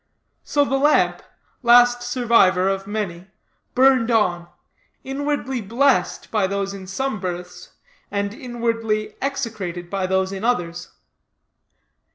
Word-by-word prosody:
So 290 Hz, -1 st, +1 dB
the 270 Hz, -1 st, 0 dB
lamp 295 Hz, +2 st, +3 dB, 0.4 s
last 245 Hz, 0 st, +5 dB
survivor 235 Hz, -7 st, +3 dB
of 195 Hz, 0 st, -2 dB
many 190 Hz, -4 st, -4 dB, 0.5 s
burned 255 Hz, -2 st, +4 dB
on, 180 Hz, -7 st, +1 dB, 0.6 s
inwardly 270 Hz, -2 st, -2 dB
blessed 230 Hz, -3 st, +1 dB
by 210 Hz, -4 st, +2 dB
those 200 Hz, 0 st, -2 dB
in 190 Hz, -1 st, -9 dB
some 240 Hz, +3 st, -3 dB
berths, 180 Hz, -1 st, -6 dB, 0.4 s
and 200 Hz, 0 st, -2 dB
inwardly 230 Hz, -3 st, -2 dB
execrated 215 Hz, -11 st, -4 dB
by 195 Hz, -2 st, -1 dB
those 190 Hz, 0 st, 0 dB
in 195 Hz, +1 st, -6 dB
others. 175 Hz, -7 st, -1 dB
215 Hz, 115 wpm, -22 LUFS, 190-245 Hz, 0.6 s, last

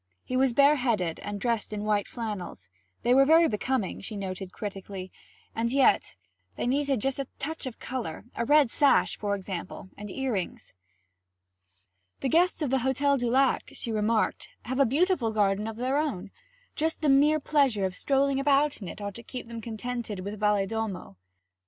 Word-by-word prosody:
He 255 Hz, -, -4 dB
was 260 Hz, 0 st, +3 dB
bareheaded 245 Hz, -, +3 dB
and 205 Hz, 0 st, -5 dB
dressed 230 Hz, -1 st, -1 dB
in 210 Hz, -1 st, -4 dB
white 210 Hz, -1 st, +1 dB
flannels; 205 Hz, -, -6 dB, 0.4 s
they 245 Hz, -, +4 dB
were 270 Hz, +1 st, +7 dB
very 325 Hz, +4 st, +6 dB
becoming, 225 Hz, -2 st, -2 dB
she 210 Hz, +1 st, -6 dB
noted 190 Hz, -1 st, -5 dB
critically, 195 Hz, -2 st, -7 dB, 0.4 s
and 230 Hz, +1 st, -1 dB
yet 270 Hz, 0 st, +3 dB, 0.4 s
they -, -, -3 dB
needed 275 Hz, 0 st, +1 dB
just 270 Hz, +3 st, 0 dB
a 275 Hz, -, -3 dB
touch 315 Hz, 0 st, -4 dB
of 245 Hz, -, -7 dB
colour; 230 Hz, -10 st, -5 dB
a -, -, -1 dB
red 290 Hz, -1 st, +4 dB
sash, 285 Hz, -2 st, +4 dB
for 205 Hz, -1 st, -1 dB
example, 185 Hz, -1 st, -7 dB
and 210 Hz, 0 st, -8 dB
earrings. 230 Hz, -5 st, -3 dB, 1.5 s
'The 270 Hz, -, 0 dB
guests 345 Hz, +2 st, +3 dB
of 275 Hz, -, -1 dB
the 265 Hz, -, +3 dB
Hotel 265 Hz, +3 st, +2 dB
du 245 Hz, -3 st, -1 dB
Lac,' 265 Hz, +2 st, +2 dB
she 230 Hz, -, -4 dB
remarked, 215 Hz, +1 st, 0 dB, 0.2 s
'have 260 Hz, +2 st, -2 dB
a 275 Hz, -, +5 dB
beautiful 295 Hz, -2 st, +2 dB
garden 210 Hz, -1 st, +1 dB
of 225 Hz, -, -5 dB
their 255 Hz, +4 st, 0 dB
own. 210 Hz, -11 st, -3 dB, 0.4 s
Just 320 Hz, +1 st, -1 dB
the 310 Hz, -, +1 dB
mere 295 Hz, +3 st, +5 dB
pleasure 275 Hz, -9 st, +2 dB
of 185 Hz, -, -2 dB
strolling 275 Hz, 0 st, +1 dB
about 280 Hz, -1 st, +2 dB
in 190 Hz, -, -6 dB
it 170 Hz, -, -8 dB
ought 200 Hz, 0 st, -4 dB
to 235 Hz, -, -8 dB
keep 250 Hz, +1 st, -8 dB
them 230 Hz, -1 st, -7 dB
contented 225 Hz, -2 st, -5 dB
with 200 Hz, +2 st, -6 dB
Valedolmo.' 210 Hz, -, -1 dB
235 Hz, 175 wpm, -27 LUFS, 205-275 Hz, 1.5 s, were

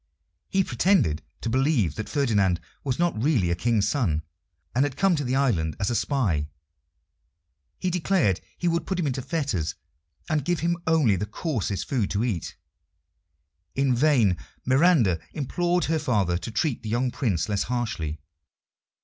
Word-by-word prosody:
He 190 Hz, 0 st, +2 dB
pretended 120 Hz, -, +2 dB, 0.2 s
to 115 Hz, -, -2 dB
believe 130 Hz, -, +2 dB
that 110 Hz, -, -5 dB
Ferdinand 105 Hz, -, +2 dB, 0.2 s
was 130 Hz, -3 st, -1 dB
not 170 Hz, -10 st, 0 dB
really 120 Hz, -, +2 dB
a -, -, +2 dB
King's 110 Hz, +2 st, +1 dB
son, 85 Hz, -, 0 dB, 0.5 s
and 130 Hz, -, +3 dB
had 145 Hz, -3 st, -2 dB
come 195 Hz, -2 st, +3 dB
to 145 Hz, -, -1 dB
the 130 Hz, 0 st, -1 dB
island 100 Hz, -, +1 dB
as 100 Hz, -, 0 dB
a -, -, 0 dB
spy. 100 Hz, -, 0 dB, 1.3 s
He 185 Hz, -, -1 dB
declared 170 Hz, -, +1 dB, 0.2 s
he 175 Hz, -, -1 dB
would 170 Hz, -1 st, 0 dB
put 190 Hz, -2 st, -1 dB
him 170 Hz, -, 0 dB
into 130 Hz, -2 st, -1 dB
fetters, 120 Hz, -, -2 dB, 0.5 s
and 155 Hz, -4 st, 0 dB
give 175 Hz, +2 st, 0 dB
him 170 Hz, +1 st, +1 dB
only 150 Hz, -12 st, +4 dB
the 105 Hz, -, -3 dB
coarsest 110 Hz, -, -2 dB
food 120 Hz, -8 st, 0 dB
to 105 Hz, +2 st, 0 dB
eat. 105 Hz, -9 st, -2 dB, 1.2 s
In 135 Hz, -1 st, +2 dB
vain 120 Hz, -, +3 dB, 0.3 s
Miranda 130 Hz, -, +4 dB
implored 175 Hz, +5 st, 0 dB
her 160 Hz, 0 st, +1 dB
father 105 Hz, -, +1 dB
to 85 Hz, +5 st, -4 dB
treat 120 Hz, +3 st, -1 dB
the 110 Hz, -, -6 dB
young 120 Hz, +3 st, 0 dB
Prince 105 Hz, -, 0 dB
less 100 Hz, -2 st, 0 dB
harshly. 85 Hz, -11 st, -2 dB
125 Hz, 160 wpm, -25 LUFS, 100-155 Hz, 1.3 s, only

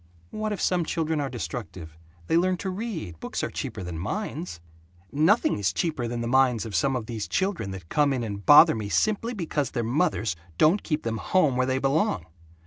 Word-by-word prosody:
"What 215 Hz, 0 st, -3 dB
if 205 Hz, -, -3 dB
some 180 Hz, -2 st, +1 dB
children 160 Hz, -1 st, -1 dB
are 140 Hz, -, -2 dB
destructive? 105 Hz, -, -6 dB, 0.3 s
They 130 Hz, -, +1 dB
learn 185 Hz, +2 st, +2 dB
to 190 Hz, +2 st, -4 dB
read. 185 Hz, -, -5 dB
Books -, -, -4 dB
are -, -, -2 dB
cheaper -, -, -5 dB
than 85 Hz, -2 st, -5 dB
minds." 165 Hz, -, -4 dB, 0.5 s
"Nothing 155 Hz, -, +3 dB
is 100 Hz, -2 st, +1 dB
cheaper 155 Hz, -9 st, -2 dB
than 120 Hz, 0 st, -3 dB
the 120 Hz, -, -2 dB
minds 125 Hz, -3 st, +3 dB
of 110 Hz, -, -7 dB
some 135 Hz, -1 st, +2 dB
of 120 Hz, -4 st, -3 dB
these 110 Hz, -2 st, -5 dB
children 190 Hz, -, -1 dB
that 95 Hz, -3 st, -8 dB
come 145 Hz, -, +2 dB
in 130 Hz, -3 st, -1 dB
and 100 Hz, -2 st, -5 dB
bother 150 Hz, -, +8 dB
me 105 Hz, -2 st, -4 dB
simply 215 Hz, -, 0 dB
because 155 Hz, -, -2 dB
their 120 Hz, -, -2 dB
mothers 115 Hz, -, 0 dB, 0.2 s
don't 170 Hz, +7 st, +4 dB
keep 155 Hz, -2 st, -2 dB
them 115 Hz, -1 st, -2 dB
home 155 Hz, -1 st, +2 dB
where 130 Hz, 0 st, +1 dB
they 130 Hz, 0 st, +1 dB
belong. 135 Hz, -, +1 dB
135 Hz, 205 wpm, -26 LUFS, 110-175 Hz, 0.5 s, bother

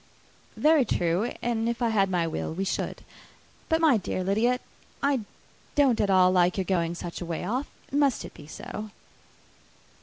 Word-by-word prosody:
"Very 305 Hz, -2 st, +5 dB
true; 180 Hz, +1 st, 0 dB
and 230 Hz, -1 st, 0 dB
if 235 Hz, -, -2 dB
I 235 Hz, -2 st, +1 dB
had 200 Hz, -3 st, +2 dB
my 175 Hz, -2 st, +1 dB
will 165 Hz, -, -3 dB
we 190 Hz, -, -1 dB
should. -, -, -3 dB, 0.7 s
But, 320 Hz, 0 st, +2 dB
my 305 Hz, -7 st, +5 dB
dear 185 Hz, -1 st, -3 dB
Lydia, 225 Hz, +6 st, +2 dB, 0.4 s
I 280 Hz, -2 st, +3 dB, 0.6 s
don't 275 Hz, -5 st, +4 dB
at 205 Hz, -, +1 dB
all 185 Hz, -1 st, +5 dB
like 180 Hz, 0 st, +3 dB
your 190 Hz, -, 0 dB
going 170 Hz, -3 st, 0 dB
such 175 Hz, 0 st, -6 dB
a -, -, -3 dB
way 170 Hz, +1 st, -3 dB
off. 250 Hz, +8 st, -1 dB, 0.2 s
Must 280 Hz, -3 st, +2 dB
it -, -, -10 dB
be 145 Hz, -, -13 dB
so?" 215 Hz, +6 st, -7 dB
210 Hz, 175 wpm, -27 LUFS, 180-250 Hz, 0.7 s, Very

